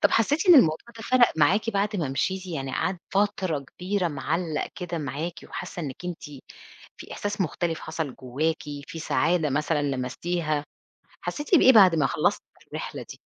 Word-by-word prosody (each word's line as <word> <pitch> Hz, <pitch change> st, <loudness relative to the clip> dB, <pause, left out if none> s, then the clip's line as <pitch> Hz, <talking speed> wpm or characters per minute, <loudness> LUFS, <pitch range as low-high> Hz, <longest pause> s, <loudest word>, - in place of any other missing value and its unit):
طب -, -, +4 dB
حسّيتِ 290 Hz, -, +2 dB
إن 350 Hz, -, +10 dB
الموضوع 160 Hz, -, +6 dB, 0.2 s
ده 225 Hz, -, -8 dB
فرق 255 Hz, -2 st, +4 dB
معاكِ 205 Hz, +8 st, +3 dB
بعد 205 Hz, +1 st, 0 dB
ما 155 Hz, -7 st, -1 dB
مشيتِ، 185 Hz, +7 st, -1 dB
يعني 135 Hz, -6 st, -4 dB
قعد 180 Hz, +2 st, -1 dB
فترة 195 Hz, -6 st, +1 dB
كبيرة 180 Hz, +6 st, -2 dB
معلّق 155 Hz, +2 st, -2 dB
كده 175 Hz, -2 st, -4 dB
معاكِ 150 Hz, +4 st, -4 dB
وحاسّة 175 Hz, -, -6 dB
إنّك 140 Hz, +4 st, -7 dB
أنتِ 175 Hz, -2 st, -5 dB, 0.7 s
في -, -, -10 dB
إحساس 205 Hz, 0 st, -4 dB
مختلف 165 Hz, -1 st, -1 dB
حصل 155 Hz, -4 st, -4 dB
جوّاكِ، 140 Hz, +5 st, -2 dB, 0.2 s
في 165 Hz, -, -8 dB
سعادة 160 Hz, 0 st, +1 dB
مثلًا 150 Hz, +2 st, 0 dB
لمستيها، 145 Hz, +4 st, -2 dB, 0.6 s
حسّيتِ 295 Hz, +5 st, -2 dB
بإيه 260 Hz, -5 st, +8 dB
بعد 190 Hz, -6 st, +7 dB
ما 150 Hz, -4 st, +3 dB
خلصتِ -, -, 0 dB, 0.3 s
الرحلة -, -, -5 dB
دي؟ -, -, -9 dB
170 Hz, 160 wpm, -26 LUFS, 150-195 Hz, 0.7 s, إن